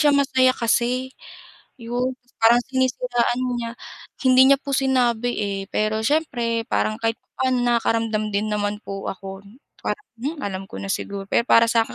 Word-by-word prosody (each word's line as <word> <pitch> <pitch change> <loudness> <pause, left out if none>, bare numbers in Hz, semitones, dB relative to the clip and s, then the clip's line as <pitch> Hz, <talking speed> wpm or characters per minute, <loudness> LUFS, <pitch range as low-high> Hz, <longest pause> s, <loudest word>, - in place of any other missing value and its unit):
siya 295 -1 +5
masaya 260 -2 +3
kasi, 245 +3 0 0.7
yun 245 +2 -1 0.3
parang 230 +1 +6
sinisiraan 250 -2 0 0.2
niya 235 -1 -3 0.6
hindi 255 0 +7
niya 275 - +6
po 280 - -7
sinabi, 245 -3 +2
eh. 200 -2 -2
Pero 215 +1 0
siyempre 240 -6 0
parang 215 - 0
kahit 225 0 +1
papaano 260 -1 -1
nakaramdam 225 -2 +1
din 210 +2 0
naman 205 0 -1
po 195 0 -6
ako, 195 0 -8 0.4
parang, 420 - -3
hmm, 295 +6 -3
alam 195 -1 -4
ko - - -11
na 100 - -5
siguro. 200 -1 -4
Pero 235 - +3
para 230 0 +6
sakin 230 -1 +1
235 Hz, 155 wpm, -22 LUFS, 215-255 Hz, 0.7 s, hindi